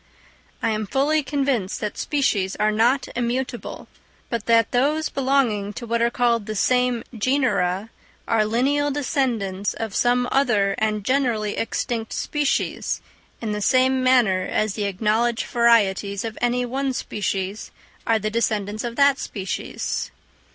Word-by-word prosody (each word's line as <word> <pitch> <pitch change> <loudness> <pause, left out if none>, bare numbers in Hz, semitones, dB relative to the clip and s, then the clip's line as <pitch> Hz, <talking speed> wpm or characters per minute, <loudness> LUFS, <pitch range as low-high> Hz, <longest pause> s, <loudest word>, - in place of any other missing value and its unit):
I 230 - +2
am 215 -1 -2
fully 290 +7 +2
convinced 270 -8 -1
that 210 -1 -3
species 210 -10 0
are 215 0 +1
not 235 +6 +2
immutable; 245 +1 -3 0.4
but 230 -3 -3
that 230 -1 +4
those 295 +5 +1
belonging 255 -7 +1
to 235 - -7
what 235 0 0
are 235 - +3
called 235 -3 +1
the 215 - -3
same 250 +2 +2
genera 210 -5 0 0.4
are 225 -2 +3
lineal 270 +7 +1
descendants 240 -9 -1
of 220 -3 -4
some 245 +2 +2
other 215 -8 +2
and 215 -1 0
generally 240 -6 +1
extinct 225 0 -2
species, 295 -2 -1 0.4
in 220 -2 -2
the 210 0 -2
same 260 +3 +3
manner 245 -8 +4
as 215 +2 -1
the 210 -1 -2
acknowledged 220 +5 +1
varieties 205 -4 +2
of 225 0 -5
any 245 +1 +1
one 265 +2 -2
species 195 -3 -3 0.4
are 225 - +4
the 215 0 -3
descendants 215 -2 -1
of 235 -1 -4
that 280 0 +4
species. 190 -4 -4
230 Hz, 140 wpm, -23 LUFS, 210-255 Hz, 0.4 s, that